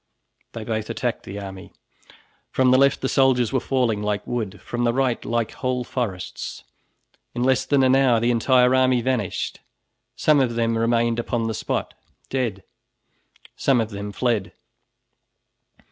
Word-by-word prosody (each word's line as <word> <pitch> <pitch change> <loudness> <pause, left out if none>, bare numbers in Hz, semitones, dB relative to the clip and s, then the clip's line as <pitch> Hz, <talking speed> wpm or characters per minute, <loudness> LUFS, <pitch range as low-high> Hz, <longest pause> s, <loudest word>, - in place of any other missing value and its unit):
They 115 - -6
both 110 -1 -3
attacked 120 -2 -3
the 100 +2 -6
army. 95 -2 -9 0.8
From 130 -1 +3
the 130 - +6
left 140 0 +3
the 130 - 0
soldiers 130 -3 +2
were 130 - +3
falling 125 -6 0
like 105 0 -2
wood, 110 -4 -4
from 120 0 -4
the 120 -1 +2
right 130 -3 0
like 115 -1 -1
whole 130 -1 -2
forests. 115 -8 -5 0.7
In 120 - -1
less 130 0 +2
than 140 -1 +3
an 130 0 +5
hour 130 -4 +4
the 120 +2 +2
entire 125 +1 +4
army 130 -1 +3
vanished. 125 -7 -2 0.6
Some 150 -2 +3
of 125 -3 +1
them 115 0 +1
remained 115 0 +1
upon 120 -1 -1
the 115 - -1
spot, - - -3 0.4
dead; 115 -8 -2 0.9
some 135 -3 +2
of 115 -1 -2
them 100 0 -5
fled. 110 -2 -1
120 Hz, 155 wpm, -23 LUFS, 110-130 Hz, 0.9 s, the